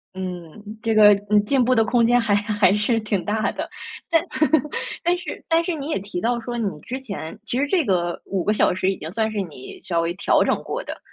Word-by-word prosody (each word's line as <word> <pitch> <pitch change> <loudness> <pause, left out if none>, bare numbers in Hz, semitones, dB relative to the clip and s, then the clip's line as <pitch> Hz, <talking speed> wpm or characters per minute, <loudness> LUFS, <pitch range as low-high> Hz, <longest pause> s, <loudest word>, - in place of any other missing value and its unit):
嗯。 185 +3 -7
这 225 -1 0
个 210 -1 +8 0.2
嗯， 210 -1 +4
进 265 +1 +2
步 255 +2 +3
的 225 - +4
空 235 0 +3
间 245 +1 +4
还 220 -3 +1
还 205 -2 +2
是 225 +2 +1
挺 210 -4 -2
大 215 +1 0
的。 - - -5 0.4
但 330 -1 +4 0.8
但 350 +1 +2
是 355 - -7
但 330 +1 +3
是 350 - -2
你 295 0 -5
也 305 - 0
提 195 -2 -5
到 235 +1 0
说， 240 +1 -5
你 220 -3 0
之 260 +8 -5
前 200 - -7
其 245 - -1
实 285 - +1
这 335 -3 +1
个 175 -3 0
5 190 -3 -2
个 210 - +2
小 210 - +3
时 185 +1 0
已 - - -5
经 160 +2 -7
算 220 +1 -1
是 205 -2 -2
你 150 -8 -9
稍 170 -2 0
微 170 +1 -1
调 185 - +2
整 - - +2
过 - - -4
的， - - -7
215 Hz, 250 characters per minute, -22 LUFS, 190-245 Hz, 0.8 s, 个